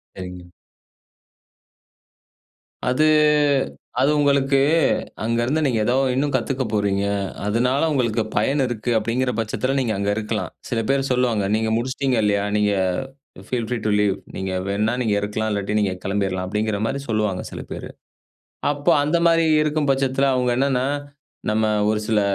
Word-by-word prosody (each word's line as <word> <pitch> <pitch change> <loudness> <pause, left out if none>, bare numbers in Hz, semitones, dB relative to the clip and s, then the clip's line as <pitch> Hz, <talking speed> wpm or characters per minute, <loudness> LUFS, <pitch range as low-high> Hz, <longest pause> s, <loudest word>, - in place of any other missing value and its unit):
சரிங்க. 90 -1 -8 2.5
அது 130 +5 +2 1.0
அது 140 +3 +4
உங்களுக்கு, 140 -1 +3 0.6
அங்க 115 +1 0
இருந்து 155 +5 0
நீங்க 125 -5 +1
ஏதோ 125 - +2 0.2
இன்னும் 140 +2 0
கத்துக்க 130 +1 -1
போறீங்க, 100 -1 +1 0.4
அதுனால 125 +6 +1
உங்களுக்கு 120 -5 +1 0.2
பயன் 135 +7 +2
இருக்கு, 120 -1 -3
அப்டிங்கிற 125 +3 -1
பட்சத்தில 130 +4 -1
நீங்க 120 -4 0
அங்க 100 +1 -1
இருக்கலாம். 110 0 -3 0.2
சில 120 - 0
பேர் 135 0 +1
சொல்லுவாங்க, 125 -5 +1
நீங்க 110 0 0
முடிச்சிட்டீங்க 130 +1 -1
இல்லையா, 100 -1 +2
நீங்க 105 0 +2 0.8
ஃபீல் 120 -3 -2
ஃப்ரீ 125 - -1
டூ 105 - +2
லீவ். 100 -2 +2 0.2
"நீங்க 95 0 -3 0.2
வேண்ணா 105 +3 0
நீங்க 110 -4 +1
இருக்கலாம், 110 +1 -2
இல்லாட்டி 100 0 -2
நீங்க 100 -3 +1
கெளம்பிர்லாம்" 95 -2 -1
அப்டிங்கிற 105 +1 -1
மாரி 140 - -2
சொல்லுவாங்க. 105 -4 0
சில - - -6
பேரு. - - -6 0.8
அப்போ 145 0 +1
அந்த 150 +4 +1
மாரி 165 -1 +4 0.2
இருக்கும் 150 -1 0
பட்சத்தில, 135 0 +2
அவுங்க 125 -1 +1
என்னன்னா, 130 -1 +1 0.6
நம்ம 110 +1 +1 0.2
ஒரு 105 0 +1
சில 110 -2 +2
115 Hz, 140 wpm, -22 LUFS, 105-135 Hz, 2.5 s, அது